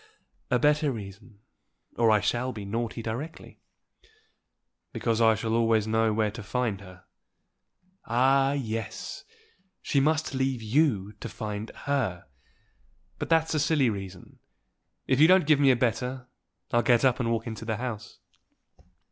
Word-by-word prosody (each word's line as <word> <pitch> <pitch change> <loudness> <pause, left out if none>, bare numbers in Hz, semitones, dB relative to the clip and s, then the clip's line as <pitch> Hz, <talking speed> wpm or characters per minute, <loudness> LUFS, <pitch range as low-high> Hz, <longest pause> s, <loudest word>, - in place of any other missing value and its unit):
"A - - +3
better 150 +2 +2
reason, 100 -1 -10 0.5
or 115 -1 +3
I 105 -1 +4
shall 120 +4 -1
be 105 -4 -7
naughty 115 +2 -3
directly." 125 +9 -6 1.3
"Because 115 -1 0
I 110 -1 +5
shall 110 +1 -2
always 115 -2 +2
know 110 0 +1
where 105 -1 0
to 110 - -8
find 110 -1 -2
her." 90 -2 -14 1.0
"Ah, 135 +4 +3
yes! 115 -5 -5 0.5
she 140 - 0
must 155 +1 +1
leave 130 -3 -1
you 110 -5 +1
to 115 - -6
find 105 0 -5 0.2
her. 130 -12 -1 0.9
But - - -4
that's 160 -1 +2
a 155 - +1
silly 145 -5 +2
reason. 95 -3 -9 0.7
If 130 0 +1
you 155 - +8
don't 185 -2 +5
give 150 -1 +4
me 140 -1 +5
a 130 - +5
better, 125 +1 -2 0.4
I'll 120 -2 +3
get 120 +2 +3
up 130 -2 +3
and 120 -2 0
walk 115 -1 -1
into 115 -1 -6
the 110 -1 -2
house." 115 -2 -6
115 Hz, 150 wpm, -27 LUFS, 110-135 Hz, 1.3 s, you